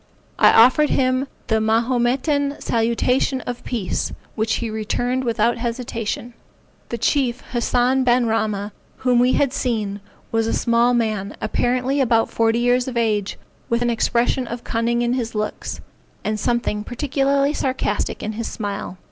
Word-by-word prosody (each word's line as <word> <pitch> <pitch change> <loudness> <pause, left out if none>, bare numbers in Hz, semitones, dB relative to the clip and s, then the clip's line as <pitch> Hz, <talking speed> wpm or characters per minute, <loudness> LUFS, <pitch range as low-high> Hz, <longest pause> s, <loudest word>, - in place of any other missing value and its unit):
I - - +7
offered 255 +6 +6
him 255 +1 +1 0.2
the 220 -1 +1
Mahometan 255 +6 +1
salutation 245 +3 +1
of 245 0 -6
peace, 220 -8 -2 0.2
which 220 0 0
he 230 -2 -3
returned 245 +4 -1
without 235 0 +1
hesitation. 235 -1 -3 0.6
The 235 - -3
chief, 245 +1 +1
Hassan 250 +2 +2
ben 245 0 +3
Rahma, 215 -2 -1 0.3
whom 250 -2 +2
we 250 +1 +4
had 275 -2 +2
seen, 215 -7 -2 0.3
was 225 0 +1
a - - 0
small 235 +1 +2
man, 215 -3 -1
apparently 250 +5 0
about 230 -3 +2
forty 225 0 +2
years 245 +1 +2
of 250 -2 -4
age, 210 -4 0 0.3
with 235 +1 +1
an 240 - +1
expression 240 +2 +1
of 235 +1 -6
cunning 235 +1 0
in 240 0 +1
his 235 -3 -3
looks, 210 0 -3 0.4
and 215 0 -1
something 235 -2 -1
particularly 275 +3 0
sarcastic 260 -7 -2
in 215 - -2
his 225 +1 -4
smile. 200 -3 -5
235 Hz, 150 wpm, -21 LUFS, 225-255 Hz, 0.6 s, I